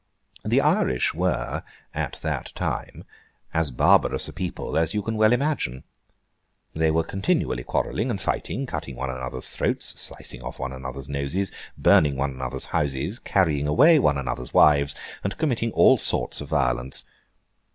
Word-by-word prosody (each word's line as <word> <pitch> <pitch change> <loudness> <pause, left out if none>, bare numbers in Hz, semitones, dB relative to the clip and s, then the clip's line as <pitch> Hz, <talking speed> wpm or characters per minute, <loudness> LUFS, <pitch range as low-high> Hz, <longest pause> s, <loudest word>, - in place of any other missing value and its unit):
The - - +3
Irish 65 - +2
were, - - -1 0.3
at - - -3
that - - -3
time, - - -4 0.5
as 80 -2 +1
barbarous 60 - +3
a - - -9
people 90 -1 -4
as 80 +3 +1
you 105 - 0
can 115 +2 -2
well 110 0 +4
imagine. 120 - 0 0.9
They 80 0 +2
were 80 +1 +2
continually 80 -10 -1
quarrelling 125 - -1
and 105 -5 -2
fighting, 130 +7 -2
cutting 75 - -5
one 65 +2 -3
another's 65 0 -5
throats, - - -1
slicing - - -5
one 65 0 -5
another's 65 +1 -7
noses, 70 +8 -2 0.3
burning 75 -3 +4
one 70 +1 0
another's 65 0 -5
houses, 75 - -1
carrying 75 -7 +1
away 150 - +6
one 75 - +3
another's 60 -2 -4
wives, 70 -1 +5 0.3
and 100 - -3
committing 125 -7 0
all - - +6
sorts - - 0
of 75 - -6
violence. 65 -3 0
75 Hz, 150 wpm, -24 LUFS, 65-95 Hz, 0.9 s, away